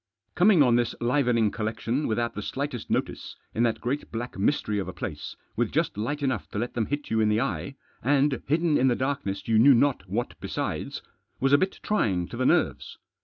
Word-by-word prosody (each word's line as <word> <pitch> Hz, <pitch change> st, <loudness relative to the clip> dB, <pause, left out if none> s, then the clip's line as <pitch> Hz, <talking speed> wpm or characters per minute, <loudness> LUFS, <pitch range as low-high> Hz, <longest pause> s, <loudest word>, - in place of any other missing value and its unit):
Coming 180 Hz, -4 st, +5 dB
on 120 Hz, -3 st, +4 dB
this 120 Hz, -1 st, 0 dB
livening 120 Hz, -4 st, +2 dB
collection 115 Hz, +5 st, -2 dB
without 115 Hz, +1 st, -1 dB
the 105 Hz, -, -5 dB
slightest 135 Hz, +1 st, -4 dB
notice, -, -, -2 dB, 0.2 s
in 115 Hz, -, -1 dB
that 120 Hz, -2 st, +1 dB
great 135 Hz, +5 st, -3 dB
black 120 Hz, +2 st, -5 dB
mystery 105 Hz, 0 st, 0 dB
of 95 Hz, -, -3 dB
a 90 Hz, -, -5 dB
place, -, -, -6 dB, 0.2 s
with -, -, 0 dB
just -, -, 0 dB
light 145 Hz, +8 st, -3 dB
enough 110 Hz, -, -1 dB
to -, -, -6 dB
let 120 Hz, +3 st, -2 dB
them 115 Hz, -3 st, -1 dB
hit 145 Hz, 0 st, -4 dB
you 110 Hz, -, +2 dB
in 110 Hz, -1 st, +3 dB
the 105 Hz, +1 st, +2 dB
eye, 95 Hz, -, -3 dB, 0.3 s
and 140 Hz, 0 st, +2 dB
hidden 155 Hz, +2 st, +2 dB
in 130 Hz, -, +4 dB
the 125 Hz, -, +3 dB
darkness 130 Hz, -8 st, -3 dB
you 110 Hz, -1 st, +4 dB
knew 135 Hz, +3 st, +7 dB
not 120 Hz, -6 st, +1 dB
what 120 Hz, +5 st, -2 dB
besides, -, -, -4 dB, 0.4 s
was 135 Hz, +1 st, +2 dB
a -, -, +8 dB
bit 190 Hz, -, -1 dB
trying 95 Hz, -, 0 dB
to -, -, -7 dB
the -, -, +1 dB
nerves. -, -, +1 dB
120 Hz, 210 wpm, -26 LUFS, 110-140 Hz, 0.4 s, a